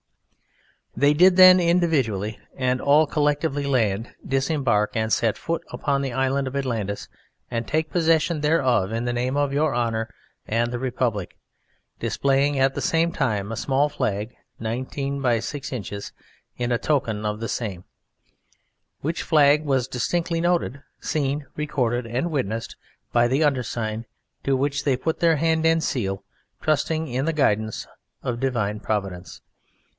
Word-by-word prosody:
They 145 +1 +4
did 180 +4 +6
then 185 0 +9
each 170 -1 +2
individually 130 - +1 0.2
and 130 -1 0
all 145 +2 +5
collectively 145 -1 0
land, 115 -5 0
disembark 135 -6 +1
and 110 0 0
set 115 -2 +1
foot 165 0 -3
upon 140 -1 -1
the 135 -2 -2
Island 135 +2 0
of 130 - -5
Atlantis 115 -7 -2 0.4
and 115 -1 -3
take 155 +1 -1
possession 165 -2 +2
thereof 130 - +2
in 115 +2 -2
the 120 - -1
name 125 +3 -1
of 145 -1 +1
Your 145 -2 +1
Honour 115 -2 -1 0.4
and 115 +2 0
the 120 - -3
Republic, 120 -6 -2 0.6
displaying 140 +1 +1
at 135 0 +3
the - - -4
same 165 +1 +2
time 105 -8 -1
a - - -3
small 135 +5 +1
flag 105 -3 -2 0.2
19" 135 +5 -3
x 120 -3 +2
6" 145 -2 -5 0.9
in 120 0 -1
token 120 -8 0
of 105 0 -2
the 115 - -3
same, 100 -7 -3 1.2
which 160 +4 -2
flag 150 -1 +4
was 135 -4 +1
distinctly 165 +7 -1
noted, 170 -6 0 0.2
seen, 145 -1 -1
recorded 125 -5 -1
and 130 +9 -2
witnessed 115 -6 -2 0.4
by 120 0 +4
the 135 +5 +2
undersigned, 115 -5 -1 0.4
to 135 -1 +2
which 140 +1 -1
they 135 -3 +2
put 160 +5 -2
their 165 -2 +4
hand 160 +1 +1
and 165 0 +3
seal, 95 -10 -2 0.4
trusting 155 +1 0
in 130 +1 -1
the 165 - 0
guidance 110 -7 0 0.4
of 120 -1 -2
Divine 110 -6 -1
Providence. 95 -4 -4
135 Hz, 150 wpm, -24 LUFS, 115-150 Hz, 1.2 s, then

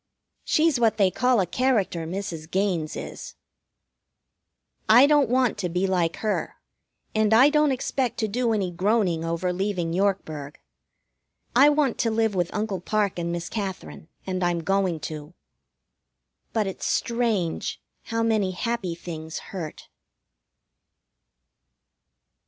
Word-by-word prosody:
She's 310 -4 +2
what 225 -2 +3
they 195 -3 +3
call 250 +2 +2
a 190 - +2
character, 200 -7 0
Mrs. 165 -3 -5
Gaines 180 -5 -1
is. - - -7 1.5
I 240 +5 +8
don't 290 -4 +4
want 250 -4 +2
to 180 -3 -1
be 180 +3 0
like 175 -3 +1
her, 210 - -1 0.6
and 215 0 +3
I 265 +6 +7
don't 300 -1 +3
expect 255 -1 -1
to 220 - 0
do 235 +3 0
any 200 -5 0
groaning 185 -2 +1
over 170 +2 -1
leaving 180 -3 -2
Yorkburg. 165 -7 -1 1.0
I 275 +4 +7
want 290 -4 +1
to 230 - +2
live 220 -1 +1
with 175 -2 -1
Uncle 210 -4 -2
Parke 205 -1 0
and 170 0 -2
Miss 175 0 -3
Katherine, 195 -6 -5 0.2
and 185 -1 -2
I'm 175 -1 0
going 190 -2 +1
to. 155 +2 -7 1.2
But 220 -2 0
it's 190 - -4
strange 230 -8 -1 0.3
how 230 0 -1
many 215 -4 +1
happy 215 -3 -2
things 160 -2 -7 0.2
hurt. 165 -5 -6
195 Hz, 130 wpm, -25 LUFS, 175-230 Hz, 1.5 s, I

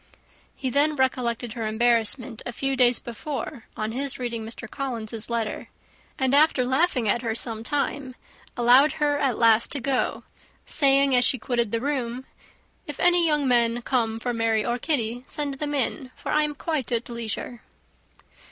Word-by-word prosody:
He 260 -2 -3
then 295 +3 +2
recollected 245 -3 -1
her 230 -2 -3
embarrassment 235 +2 +1
a - - -5
few 270 +3 -1
days 245 -1 +5
before 265 +1 -6
on 215 0 -2
his 270 +3 -2
reading 235 -3 -4
Mr. 225 +2 -7
Collins's 230 -3 -2
letter; 230 -3 -3 0.5
and 265 0 +1
after 285 -3 +4
laughing 260 -2 +1
at 230 +3 +2
her 225 -3 -2
some 225 -1 -4
time, 280 -1 -2 0.4
allowed 250 +5 +5
her 290 -1 0
at 265 -5 0
last 230 -1 +4
to 285 - -1
go, 265 0 -1 0.4
saying, 275 -2 +3
as 245 - +4
she 260 - +2
quitted 235 -2 -1
the 230 - -1
room, 260 -2 -3 0.6
"If 295 - -7
any 350 -1 +4
young 295 -3 +1
men 240 -1 +2
come 230 -4 0
for 245 +2 -3
Mary 225 -2 +1
or 240 +1 -1
Kitty, 245 -5 -1
send 285 -3 -3
them 295 -1 -2
in, 265 0 -1
for - - -6
I 305 0 +3
am 295 -1 -4
quite 290 -5 -3
at 235 0 -1
leisure." 235 0 -5
250 Hz, 170 wpm, -25 LUFS, 230-280 Hz, 0.6 s, days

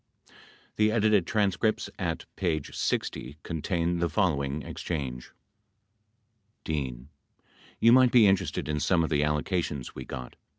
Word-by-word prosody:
95 - - -22 0.4
The 105 0 +3
edited 105 -5 +3
transcripts, 105 0 +1
at 85 -4 -2
p. 85 -4 0
60, 70 +1 -3
contain 85 +2 -1
the 85 0 +1
following 75 -5 0
exchange: 65 -7 -5 1.3
D. 65 -5 -3 0.7
You 115 - +6
might 125 0 +6
be 120 -3 +7
interested 95 -2 +1
in 75 0 -1
some 85 +2 +2
of 80 - -2
the 75 -1 +2
allocations 75 -2 -1
we - - -7
got. 65 -1 -8
85 Hz, 130 wpm, -28 LUFS, 75-100 Hz, 1.3 s, be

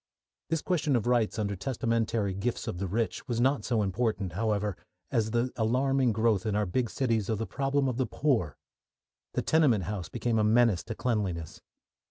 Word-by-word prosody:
This 165 -1 -1
question 155 -6 +1
of 120 - 0
rights 120 -3 +2
under 100 -2 -1
testamentary 115 -2 -1
gifts 115 +6 -3
of 90 - -3
the 100 - -2
rich 110 +8 -2
was 120 -2 -1
not 130 -2 +2
so 115 -3 +1
important, 100 -2 -1
however, 105 -1 0 0.4
as 110 -1 +1
the 120 +2 0
alarming 130 +3 +2
growth 110 -1 +2
in 110 -2 -1
our 105 0 +1
big 115 +5 -1
cities 115 -6 0
of 110 - +1
the 115 - -2
problem 135 +2 0
of 125 -2 -2
the 130 -3 0
poor. 110 - 0 0.8
The - - -1
tenement 140 - +3
house 90 -2 -4
became 115 -2 0
a - - +3
menace 110 -3 +4
to 115 - -5
cleanliness. 95 -11 -2
115 Hz, 185 wpm, -29 LUFS, 105-125 Hz, 0.8 s, menace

